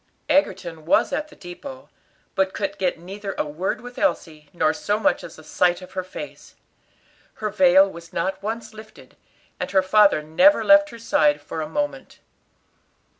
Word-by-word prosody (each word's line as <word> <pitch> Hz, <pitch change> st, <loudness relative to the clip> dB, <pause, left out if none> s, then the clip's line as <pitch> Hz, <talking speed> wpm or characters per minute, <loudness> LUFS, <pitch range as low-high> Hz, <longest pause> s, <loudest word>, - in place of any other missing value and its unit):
Egerton 180 Hz, -, 0 dB
was 225 Hz, -, +3 dB
at 300 Hz, +2 st, -2 dB
the 300 Hz, -, -17 dB
depot, 260 Hz, +10 st, -10 dB, 0.5 s
but 190 Hz, -1 st, 0 dB
could 200 Hz, -1 st, -3 dB
get 185 Hz, -2 st, 0 dB
neither 195 Hz, +4 st, -7 dB
a -, -, 0 dB
word 155 Hz, +10 st, -3 dB
with 245 Hz, 0 st, -10 dB
Elsie, 155 Hz, -, -2 dB
nor 160 Hz, -2 st, +1 dB
so 205 Hz, +6 st, -1 dB
much -, -, +1 dB
as -, -, -10 dB
a 155 Hz, -, -13 dB
sight 175 Hz, +3 st, +1 dB
of 185 Hz, -, -12 dB
her 185 Hz, -1 st, -3 dB
face. 185 Hz, -, -10 dB, 0.8 s
Her 215 Hz, -1 st, -3 dB
veil 190 Hz, -1 st, +5 dB
was 170 Hz, -3 st, -11 dB
not 190 Hz, +3 st, -2 dB
once 225 Hz, +3 st, -5 dB
lifted, 215 Hz, 0 st, -14 dB, 0.4 s
and -, -, -3 dB
her 190 Hz, -1 st, +3 dB
father 195 Hz, -4 st, +4 dB
never 270 Hz, -, +4 dB
left 300 Hz, 0 st, +6 dB
her 235 Hz, -, -10 dB
side 150 Hz, -10 st, +2 dB
for 155 Hz, +2 st, -6 dB
a 155 Hz, -, -5 dB
moment. 290 Hz, 0 st, -4 dB
190 Hz, 175 wpm, -23 LUFS, 170-220 Hz, 0.8 s, left